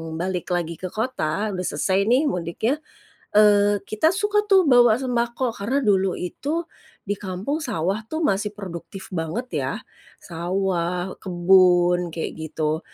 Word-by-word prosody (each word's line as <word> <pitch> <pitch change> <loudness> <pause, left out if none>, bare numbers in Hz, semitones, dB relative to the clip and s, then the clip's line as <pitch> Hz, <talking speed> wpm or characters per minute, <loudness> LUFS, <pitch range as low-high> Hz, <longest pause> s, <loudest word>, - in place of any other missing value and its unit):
balik 180 +1 -3
lagi 170 -1 -3
ke 185 - -4
kota, 215 -3 -2
udah 185 -1 -3
selesai 190 +7 0
nih 255 +6 +4
mudiknya, 180 - -2 0.5
eee, 205 -1 +5
kita 265 +10 +2
suka 415 +1 +1
tuh 385 -6 +4
bawa 240 -2 +6
sembako 240 -1 -1
karena 245 +8 -1
dulu 195 -6 +2
itu 300 - -3 0.4
di 205 0 -3
kampung 200 - -3
sawah 200 - -1
tuh 315 +4 -3
masih 205 -2 0
produktif 190 0 -8
banget 180 +9 -3 0.2
ya. - - -2 0.5
Sawah, 180 +1 -2
kebun 180 -1 +4
kayak 165 - -3 0.2
gitu. 155 0 -1
200 Hz, 135 wpm, -23 LUFS, 180-240 Hz, 0.5 s, bawa